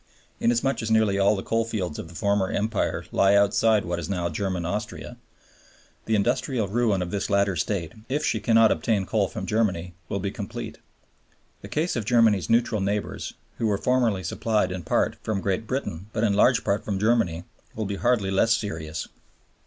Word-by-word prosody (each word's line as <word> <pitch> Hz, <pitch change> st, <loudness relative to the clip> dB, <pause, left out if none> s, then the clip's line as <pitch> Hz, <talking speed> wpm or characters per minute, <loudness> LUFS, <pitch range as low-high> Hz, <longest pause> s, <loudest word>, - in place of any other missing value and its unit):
Inasmuch 120 Hz, +3 st, +1 dB
as 110 Hz, -, -3 dB
nearly 110 Hz, -3 st, +3 dB
all 100 Hz, +2 st, +4 dB
the 95 Hz, -, -4 dB
coalfields 115 Hz, -8 st, -2 dB
of -, -, -6 dB
the 85 Hz, -, -14 dB
former 100 Hz, +1 st, +1 dB
Empire 105 Hz, 0 st, -1 dB
lie 100 Hz, +1 st, +4 dB
outside 100 Hz, +1 st, +3 dB
what 85 Hz, 0 st, -2 dB
is 80 Hz, -, -5 dB
now 90 Hz, -3 st, -1 dB
German 90 Hz, +1 st, -2 dB
Austria, 85 Hz, -, -4 dB, 0.9 s
the 110 Hz, -, +1 dB
industrial 120 Hz, +1 st, 0 dB
ruin 105 Hz, -3 st, +1 dB
of 85 Hz, -, -6 dB
this 100 Hz, -1 st, -2 dB
latter 100 Hz, -2 st, +2 dB
state, 85 Hz, -1 st, -2 dB, 0.2 s
if 145 Hz, +3 st, 0 dB
she 110 Hz, -, +1 dB
cannot 115 Hz, 0 st, +4 dB
obtain 105 Hz, -4 st, 0 dB
coal 100 Hz, 0 st, +1 dB
from 105 Hz, -1 st, -6 dB
Germany, 95 Hz, -5 st, 0 dB, 0.2 s
will -, -, -1 dB
be 100 Hz, +1 st, -2 dB
complete. 110 Hz, +2 st, -6 dB, 0.8 s
The -, -, -9 dB
case 160 Hz, +4 st, -1 dB
of 115 Hz, -4 st, -2 dB
Germany's 110 Hz, -7 st, +3 dB
neutral 115 Hz, -2 st, +2 dB
neighbors, 100 Hz, +1 st, -3 dB, 0.2 s
who 115 Hz, -, +1 dB
were 105 Hz, -2 st, +1 dB
formerly 115 Hz, -4 st, +1 dB
supplied 105 Hz, +2 st, 0 dB
in 90 Hz, 0 st, -4 dB
part -, -, 0 dB
from 110 Hz, -3 st, -2 dB
Great 100 Hz, +3 st, -2 dB
Britain 105 Hz, -9 st, -3 dB
but 110 Hz, -, -1 dB
in 105 Hz, -3 st, +3 dB
large 115 Hz, +4 st, +4 dB
part 100 Hz, +1 st, 0 dB
from 100 Hz, -2 st, -2 dB
Germany, 100 Hz, -6 st, +1 dB, 0.3 s
will 110 Hz, -, -2 dB
be 100 Hz, 0 st, -3 dB
hardly 115 Hz, -5 st, +1 dB
less 115 Hz, +4 st, +3 dB
serious. 80 Hz, -6 st, -5 dB
105 Hz, 185 wpm, -25 LUFS, 95-115 Hz, 0.9 s, all